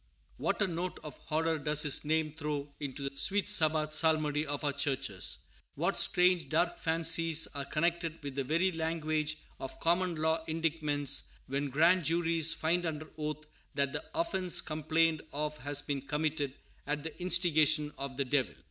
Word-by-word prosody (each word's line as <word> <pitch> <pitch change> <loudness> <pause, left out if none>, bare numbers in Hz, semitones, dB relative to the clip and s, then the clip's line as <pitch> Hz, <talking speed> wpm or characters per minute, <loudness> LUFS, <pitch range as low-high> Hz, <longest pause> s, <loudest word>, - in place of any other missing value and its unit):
What - - -1
a - - +3
note 180 0 -4
of 150 - -8
horror 160 +1 -1
does 150 0 +2
his 145 -2 +1
name 155 0 0
throw 150 -2 -4
into 140 -1 -5
the 140 - -7
sweet 200 +7 +3
Sabbath 155 -6 +5
psalmody 155 -1 +2
of 145 +1 -3
our 145 -1 0
churches. 135 -8 -1 0.3
What - - -1
strange, 180 -1 +3
dark 175 +2 +1
fancies 165 0 +3
are 140 -1 -4
connected 165 +1 -1
with 140 -1 -5
the 135 0 -2
very 170 +7 +1
language 155 -2 -2 0.2
of 135 - -7
common 175 +1 +1
law 160 +1 0
indictments, 155 -3 0 0.2
when 140 +1 -2
grand 170 +6 +4
juries 165 0 +2
find 170 +3 0
under 155 -1 -5
oath 155 0 -5 0.3
that 140 -1 0
the - - -4
offence 190 - +1
complained 155 0 0
of 150 0 -3
has 145 +2 -1
been 140 -2 -3
committed 150 -1 -2 0.3
"at 150 0 -2
the 160 - -6
instigation 155 -4 +3
of 135 -1 -6
the 140 - 0
Devil"! 130 0 0
155 Hz, 165 wpm, -31 LUFS, 145-165 Hz, 0.3 s, Sabbath